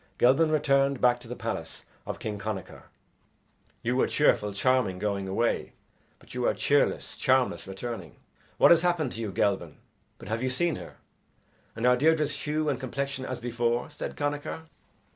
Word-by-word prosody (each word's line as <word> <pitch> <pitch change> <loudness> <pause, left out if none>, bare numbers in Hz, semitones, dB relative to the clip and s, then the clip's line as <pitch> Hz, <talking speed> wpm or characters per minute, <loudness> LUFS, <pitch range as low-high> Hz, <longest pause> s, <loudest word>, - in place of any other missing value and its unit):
Gelban 135 +6 +4
returned 140 -3 +2
back 125 0 +4
to 120 - -13
the 125 - -5
palace 115 -9 -5 0.2
of - - -4
King 105 -2 -5
Connachar. 100 -3 -6 1.0
"You 120 +2 0
were 130 - +3
cheerful, 105 -8 +2
charming, 105 -2 +1
going 100 0 -2
away, 115 +5 0 0.4
but - - -16
you - - 0
are - - +2
cheerless, - - +1
charmless, 130 -5 +1
returning. 95 -2 -6 0.4
What - - +7
has 170 -1 +7
happened 175 -6 +1
to 115 - -6
you, 105 -3 -3
Gelban? 95 -4 0 0.4
But - - -12
have 110 +1 -1
you 130 - 0
seen 165 +7 +1
her, - - -10 0.8
and 115 +2 -2
are 125 0 +6
Deirdre's 155 +1 +3
hue 155 +1 -2
and 145 - 0
complexion 135 0 -3
as 130 - -4
before?" 120 0 -1
said - - -6
Connachar. 145 +2 -3
125 Hz, 165 wpm, -28 LUFS, 110-140 Hz, 1.0 s, What